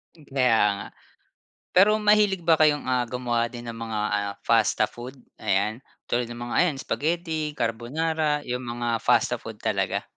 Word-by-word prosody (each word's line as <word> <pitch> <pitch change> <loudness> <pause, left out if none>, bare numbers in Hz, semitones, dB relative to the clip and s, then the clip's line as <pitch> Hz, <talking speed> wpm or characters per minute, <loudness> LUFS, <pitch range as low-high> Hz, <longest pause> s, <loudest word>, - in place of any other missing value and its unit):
Kaya 135 -7 +1 0.2
nga. - - -7 0.8
Pero 200 +4 +5
mahilig 210 -3 +3
ba 165 -1 +4
kayong, 150 -2 +4
ah, 125 -1 0
gumawa 120 -1 -1
din 120 0 -9
ng 115 - -10
mga, 110 -2 -3
ah, 100 -1 -1
pasta - - +3
food 125 +3 -6 0.2
ayan 100 +4 0 0.3
tulad 120 0 +1
ng 120 0 -7
mga 120 - -4
ayan 175 -5 +3
spaghetti, 155 +1 -2
carbonara 150 +6 -1
yung 125 -1 -4
mga 120 -1 -2
pasta - - +2
food - - -8
talaga? - - 0
125 Hz, 155 wpm, -25 LUFS, 120-160 Hz, 0.8 s, Pero